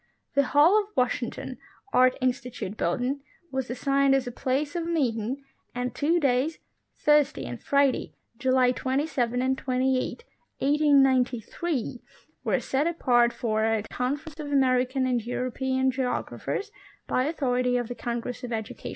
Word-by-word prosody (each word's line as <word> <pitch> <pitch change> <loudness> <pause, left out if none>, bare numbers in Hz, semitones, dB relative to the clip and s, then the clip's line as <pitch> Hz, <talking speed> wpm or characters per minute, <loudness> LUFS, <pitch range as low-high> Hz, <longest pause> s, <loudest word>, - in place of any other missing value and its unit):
The 280 - +4 0.2
Hall 350 +9 +7
of 405 - -9
Washington, 250 0 -1 0.3
Art 255 0 +5
Institute 250 -5 -2
Building, 250 +10 -1 0.3
was 265 -1 -2
assigned 275 +2 +2
as 270 -1 +1
a 245 - -4
place 275 +6 -1
of 335 -1 -2
meeting, 260 -5 -1 0.3
and 250 0 -2
two 330 +4 +2
days, 275 +2 +1 0.4
Thursday 295 -1 +3
and - - -7
Friday, 280 -2 +1 0.2
July 255 -1 +3
27 255 -2 -1
and 260 0 +2
28, 260 - -1 0.3
1893, 270 -1 +2 0.4
were - - +1
set 275 +4 0
apart 240 -8 +3
for 220 -3 -1
a 220 -1 +1
'" - - -26
Conference 290 +5 -3
of 290 -1 -5
American 260 -1 +2
and 245 -3 0
European 260 +2 0
geog 255 -1 -2
raphers 415 +1 -4 0.2
" - - -30
bv 255 +3 +1
authority 250 -5 +1
of 245 -2 -2
the 245 - -4
Congress 240 +1 -4
of 245 - -5
Education. 220 -2 -5
260 Hz, 145 wpm, -27 LUFS, 245-280 Hz, 0.4 s, Hall